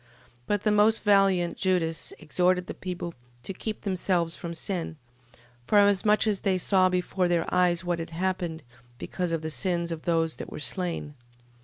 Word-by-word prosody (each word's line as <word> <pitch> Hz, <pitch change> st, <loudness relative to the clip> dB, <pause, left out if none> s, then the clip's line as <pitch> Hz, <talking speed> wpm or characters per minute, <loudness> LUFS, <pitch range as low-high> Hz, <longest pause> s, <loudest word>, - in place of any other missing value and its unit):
But 205 Hz, -1 st, 0 dB
the 215 Hz, -, +3 dB
most 210 Hz, +2 st, +4 dB
valiant 195 Hz, -4 st, +3 dB
Judas 175 Hz, -4 st, 0 dB
exhorted 180 Hz, +3 st, +1 dB
the -, -, -6 dB
people 180 Hz, -2 st, -5 dB, 0.3 s
to 195 Hz, -, -4 dB
keep 215 Hz, +3 st, -5 dB
themselves 180 Hz, -3 st, 0 dB
from 170 Hz, -2 st, -6 dB
sin, 165 Hz, -1 st, -3 dB, 0.7 s
forasmuch 205 Hz, 0 st, +4 dB
as 210 Hz, -3 st, +1 dB
they 195 Hz, -3 st, +1 dB
saw 185 Hz, 0 st, +3 dB
before 180 Hz, 0 st, 0 dB
their 175 Hz, -1 st, +1 dB
eyes 180 Hz, -1 st, +3 dB
what 175 Hz, -1 st, -1 dB
had 165 Hz, -, -5 dB
happened, 175 Hz, -2 st, -2 dB, 0.3 s
because 180 Hz, +5 st, -3 dB
of 165 Hz, -1 st, -2 dB
the 160 Hz, -, -3 dB
sins 170 Hz, 0 st, -1 dB
of 165 Hz, -1 st, -4 dB
those 165 Hz, -2 st, 0 dB
that -, -, -8 dB
were -, -, -7 dB
slain. 165 Hz, -1 st, -3 dB
180 Hz, 165 wpm, -27 LUFS, 170-195 Hz, 0.7 s, most